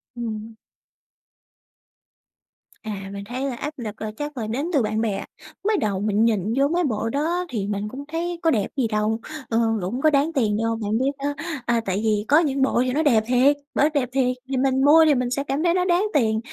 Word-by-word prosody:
Ừm. 225 Hz, -2 st, -5 dB, 2.3 s
À, 200 Hz, -3 st, -5 dB
mình 200 Hz, 0 st, -6 dB
thấy 255 Hz, +2 st, -3 dB
là 250 Hz, -, -4 dB
áp 295 Hz, +5 st, -5 dB
lực 220 Hz, -4 st, -7 dB
là 215 Hz, -1 st, -3 dB
chắc 295 Hz, -1 st, -5 dB
là 220 Hz, -3 st, -3 dB
đến 250 Hz, +7 st, -2 dB
từ 285 Hz, -, +4 dB
bạn 215 Hz, 0 st, -1 dB
bè. 215 Hz, -4 st, -1 dB, 0.4 s
Mới 430 Hz, -1 st, +3 dB
đầu 200 Hz, -, -1 dB
mình 210 Hz, +2 st, +2 dB
nhìn 215 Hz, -1 st, +1 dB
vô 275 Hz, +1 st, +4 dB
mấy 345 Hz, +4 st, +1 dB
bộ 225 Hz, -6 st, -1 dB
đó 330 Hz, +8 st, -1 dB
thì 210 Hz, -6 st, -3 dB
mình 205 Hz, 0 st, -2 dB
cũng 270 Hz, +5 st, -7 dB
thấy 340 Hz, +1 st, -3 dB
có 325 Hz, -, +4 dB
đẹp 210 Hz, -7 st, +1 dB
gì 255 Hz, -4 st, +2 dB
đâu, 215 Hz, +1 st, 0 dB, 0.3 s
ờ, 225 Hz, -, +2 dB, 0.2 s
cũng 210 Hz, +9 st, -3 dB
có 310 Hz, -, +5 dB
đáng 295 Hz, +2 st, +2 dB
tiền 220 Hz, -8 st, +1 dB
đâu. 230 Hz, 0 st, 0 dB
Bạn 210 Hz, +1 st, 0 dB
biết 265 Hz, +3 st, +1 dB
đó, 290 Hz, 0 st, 0 dB, 0.3 s
à, 235 Hz, -1 st, +1 dB
tại 190 Hz, +1 st, -1 dB
vì 210 Hz, -1 st, +1 dB
có 295 Hz, +3 st, +6 dB
những 280 Hz, -5 st, 0 dB
bộ 265 Hz, -2 st, +2 dB
thì 255 Hz, -, 0 dB
nó 310 Hz, +3 st, +1 dB
đẹp 235 Hz, -8 st, +4 dB
thiệt, 255 Hz, +4 st, +4 dB, 0.2 s
bởi 295 Hz, -, +4 dB
đẹp 265 Hz, -5 st, 0 dB
thiệt, 255 Hz, -2 st, +1 dB
thì 270 Hz, -, -1 dB
mình 265 Hz, 0 st, +2 dB
mua 320 Hz, +2 st, +7 dB
thì 300 Hz, -2 st, +4 dB
mình 250 Hz, -1 st, 0 dB
sẽ 275 Hz, +3 st, -1 dB
cảm 285 Hz, +2 st, -2 dB
thấy 345 Hz, -1 st, +3 dB
nó 360 Hz, 0 st, +1 dB
đáng 360 Hz, +2 st, +2 dB
tiền, 220 Hz, -5 st, +2 dB
250 Hz, 230 wpm, -23 LUFS, 215-290 Hz, 2.3 s, mua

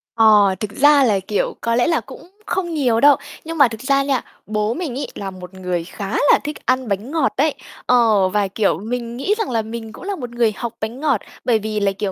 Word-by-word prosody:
Ờ, 210 Hz, -4 st, +5 dB
thực 210 Hz, -2 st, -4 dB
ra 285 Hz, +3 st, +5 dB
là, 210 Hz, -5 st, +3 dB
kiểu, 195 Hz, +2 st, -2 dB
có 230 Hz, 0 st, 0 dB
lẽ 245 Hz, -, +2 dB
là 330 Hz, -, +2 dB
cũng -, -, -13 dB, 0.2 s
không 360 Hz, -4 st, -2 dB
nhiều 250 Hz, -7 st, +2 dB
đâu. 285 Hz, +2 st, +7 dB, 0.3 s
Nhưng 330 Hz, +1 st, -5 dB
mà 280 Hz, -3 st, +7 dB
thực 225 Hz, -2 st, -8 dB
ra 275 Hz, +1 st, +2 dB
nha, 270 Hz, -3 st, 0 dB, 0.2 s
bố 215 Hz, +1 st, -1 dB
mình 315 Hz, -6 st, -4 dB
ấy -, -, -3 dB
là 195 Hz, -1 st, -5 dB
một 180 Hz, 0 st, -11 dB
người 180 Hz, -2 st, -3 dB
khá 195 Hz, +3 st, -7 dB, 0.2 s
là -, -, +5 dB
thích 300 Hz, +1 st, -4 dB
ăn 255 Hz, -1 st, +1 dB
bánh 205 Hz, +6 st, -3 dB
ngọt 315 Hz, -4 st, +1 dB
ấy. 295 Hz, +1 st, +2 dB, 0.3 s
Ờ, 220 Hz, -6 st, +4 dB
và, 205 Hz, +1 st, +1 dB
kiểu, 200 Hz, +2 st, 0 dB
mình 235 Hz, +2 st, -4 dB
nghĩ 275 Hz, +11 st, +1 dB
rằng 445 Hz, -, -2 dB
là 230 Hz, -2 st, 0 dB
mình 225 Hz, 0 st, -7 dB
cũng -, -, -11 dB
là 400 Hz, 0 st, -3 dB
một 245 Hz, -6 st, -6 dB
người 235 Hz, -2 st, +1 dB
học 235 Hz, +2 st, -5 dB
bánh 225 Hz, +4 st, -4 dB
ngọt, 280 Hz, -8 st, +1 dB, 0.2 s
bởi 230 Hz, -3 st, +3 dB
vì 215 Hz, 0 st, -3 dB
là, 200 Hz, -1 st, +2 dB
kiểu, 195 Hz, 0 st, -3 dB
230 Hz, 245 wpm, -20 LUFS, 210-275 Hz, 0.3 s, đâu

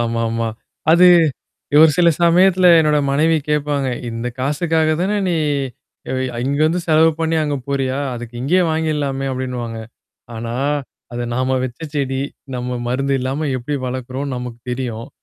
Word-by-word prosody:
ஆமாமா. 115 Hz, -1 st, -1 dB, 0.4 s
அது, 180 Hz, +2 st, +7 dB, 0.7 s
ஒரு 160 Hz, -1 st, +8 dB
சில 175 Hz, -1 st, +5 dB
சமயத்தல 180 Hz, +2 st, +5 dB
என்னோட 150 Hz, -1 st, +3 dB
மனைவி 160 Hz, +3 st, +3 dB
கேப்பாங்க. 145 Hz, -2 st, 0 dB, 0.2 s
"இந்த 115 Hz, +1 st, -4 dB
காசுக்காக 155 Hz, +3 st, +1 dB
தானே 200 Hz, +3 st, 0 dB
நீ 175 Hz, -, +1 dB, 0.8 s
எ -, -, -1 dB
வி 130 Hz, -, -1 dB
அ -, -, -5 dB
இங்க 140 Hz, +1 st, 0 dB
வந்து 175 Hz, +3 st, 0 dB
செலவு 160 Hz, +1 st, +5 dB
பண்ணீ 160 Hz, 0 st, +1 dB
அங்க 145 Hz, -1 st, -1 dB
போறியா? 135 Hz, -1 st, -1 dB, 0.2 s
அதுக்கு 120 Hz, 0 st, -8 dB
இங்கேயே 180 Hz, +7 st, +3 dB
வாங்கிடலாமே!" 150 Hz, -4 st, -1 dB
அப்டின்னுவாங்க. 125 Hz, -3 st, -4 dB, 0.6 s
ஆனா, 115 Hz, +1 st, -5 dB, 0.6 s
"அது 120 Hz, 0 st, -3 dB
நாம 130 Hz, +1 st, 0 dB
வச்ச 125 Hz, +3 st, -7 dB
செடி, 135 Hz, -2 st, -1 dB, 0.3 s
நம்ம 125 Hz, 0 st, -3 dB
மருந்து 135 Hz, +2 st, 0 dB
இல்லாம 140 Hz, +4 st, -2 dB
எப்டி 145 Hz, +4 st, -3 dB
வளக்கறோம்னு 130 Hz, +2 st, -4 dB
நமக்கு 125 Hz, -1 st, -7 dB
தெரியும். 120 Hz, -3 st, -4 dB
135 Hz, 145 wpm, -19 LUFS, 125-155 Hz, 0.8 s, ஒரு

